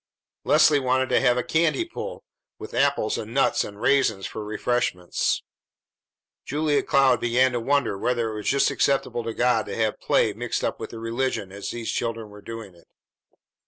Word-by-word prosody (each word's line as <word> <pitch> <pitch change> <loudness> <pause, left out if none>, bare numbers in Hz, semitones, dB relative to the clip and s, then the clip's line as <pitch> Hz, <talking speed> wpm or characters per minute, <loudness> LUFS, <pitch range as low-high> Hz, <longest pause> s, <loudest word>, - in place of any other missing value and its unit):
Leslie 145 -2 +5
wanted 130 0 +1
to - - +3
have 125 -2 +3
a 125 - 0
candy 165 - +1
pull, 485 +8 -7 0.3
with - - -9
apples - - +1
and 110 +3 -7
nuts 140 - +3
and 100 0 -9
raisins 110 -7 +2
for 110 - -6
refreshments. 105 -4 -1 1.0
Julia 150 +1 +1
Cloud 135 -2 +3
began 125 +2 +3
to 120 - -1
wonder 135 -5 0
whether 120 -1 0
it - - -6
was 105 - -5
just 140 +1 +3
as - - -3
acceptable 130 -2 0
to 115 0 -5
God 120 -3 +2
to 100 - -5
have 110 -2 -1
play - - +2
mixed - - -3
up - - -2
with - - -6
the 115 - -9
religion 115 -3 -2
as 100 +1 -6
these 115 -1 -4
children 115 -2 -3
were 105 0 -12
doing 110 -2 -8
it. 85 -1 -22
120 Hz, 185 wpm, -24 LUFS, 110-135 Hz, 1.0 s, Leslie